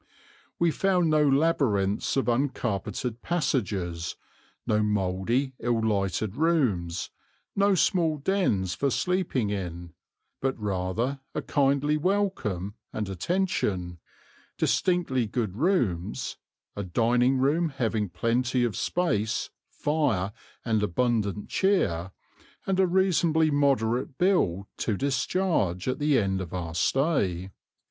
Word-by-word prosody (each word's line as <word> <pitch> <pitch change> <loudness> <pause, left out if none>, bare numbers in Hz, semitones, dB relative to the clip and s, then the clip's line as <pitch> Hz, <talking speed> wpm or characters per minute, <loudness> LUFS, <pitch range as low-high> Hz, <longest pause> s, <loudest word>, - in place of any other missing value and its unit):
We 170 -1 +3
found 180 -2 +2
no 155 0 +4
labyrinths 135 -10 +1
of 135 - +1
uncarpeted 120 -2 -1
passages, 100 - -1 0.5
no 105 0 +2
mouldy 105 +6 0
ill 120 -1 0
lighted 100 -2 0
rooms, 125 - +1 0.4
no 200 0 +3
small 165 -4 +2
dens 140 - 0
for 140 - 0
sleeping 160 - 0
in, 85 -4 -5 0.5
but 135 0 0
rather 105 +7 -1 0.2
a - - -2
kindly 140 +2 +2
welcome 150 - -1 0.2
and 105 -2 -3
attention, 95 - -1 0.6
distinctly 165 -10 +1
good 105 -3 -2
rooms, 105 - 0 0.4
a 100 - -3
dining 120 +7 +2
room 150 +6 +2
having 115 -7 -1
plenty 120 +7 0
of 115 -5 0
space, 110 - -1 0.2
fire 115 -11 0 0.3
and 110 -3 +1
abundant 105 0 0
cheer, 95 - +1 0.6
and 190 -1 0
a 190 - +5
reasonably 170 -4 +3
moderate 130 -3 +1
bill 100 - +2
to 105 -4 -1
discharge 130 - 0
at 130 - -1
the 145 -2 +3
end 95 -3 0
of 90 0 -6
our 85 -2 -4
stay. 95 - +1
120 Hz, 110 wpm, -27 LUFS, 95-155 Hz, 0.6 s, a